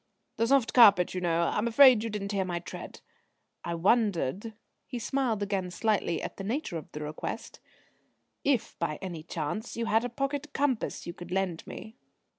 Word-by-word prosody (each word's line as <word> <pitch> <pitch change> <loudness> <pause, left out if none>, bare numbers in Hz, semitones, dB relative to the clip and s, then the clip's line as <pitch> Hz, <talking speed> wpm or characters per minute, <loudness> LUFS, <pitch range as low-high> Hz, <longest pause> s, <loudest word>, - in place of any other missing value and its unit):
"The 230 +1 +2
soft 270 -3 +3
carpet, 200 -7 +7
you 180 - -3
know. 170 -1 +1
I'm 210 +3 0
afraid 245 -1 +7
you 230 - -2
didn't 205 -2 -4
hear 195 -2 0
my 180 -2 -3
tread. 175 - -8 0.6
I 170 - -3
wondered" 200 - +1 0.3
he 250 - -5
smiled 240 -3 -1
again 195 -2 -2
slightly 180 -3 0
at - - -6
the 195 - -6
nature 225 - -2
of 155 - -14
the 150 - -7
request 150 +1 -6 0.8
"if 270 -6 +1
by 155 -3 -1
any 175 -4 -6
chance 170 +9 -4
you 230 - -1
had 225 +1 +2
a 245 - -2
pocket 280 +3 -3
compass 270 -4 -1
you 170 - -5
could 175 0 -10
lend 185 -2 -2
me?" 220 +2 -9
205 Hz, 180 wpm, -29 LUFS, 175-235 Hz, 0.8 s, carpet